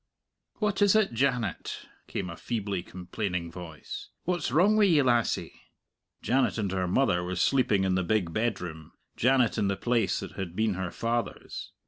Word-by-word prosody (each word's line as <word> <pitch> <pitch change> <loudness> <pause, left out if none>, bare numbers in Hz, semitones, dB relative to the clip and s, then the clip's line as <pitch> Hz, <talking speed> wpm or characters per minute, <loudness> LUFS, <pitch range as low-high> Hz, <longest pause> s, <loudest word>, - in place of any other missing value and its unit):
"What 210 -2 -1
is 205 0 +5
it, 215 - +3
Janet?" 120 -6 -1 0.2
came - - -3
a - - -7
feebly 100 -5 -3
complaining 90 -1 -4
voice; 80 -4 -8
"what's 175 -6 -1
wrong 185 +10 +4
wi' 215 -1 +5
ye, 160 -7 +4
lassie?" 120 -2 +1 0.7
Janet 130 0 +2
and 100 -4 -1
her 95 -1 0
mother 90 -3 +2
were 90 +1 -3
sleeping 105 0 +2
in 95 -1 +1
the 95 - +2
big 90 -3 0
bedroom, 90 -8 -3 0.2
Janet 125 -2 +3
in 100 - +2
the 100 -1 0
place 120 -2 +1
that - - -6
had 90 -3 -6
been 110 0 +1
her 95 -1 -3
father's. 115 +5 -3
110 Hz, 165 wpm, -28 LUFS, 90-130 Hz, 0.7 s, is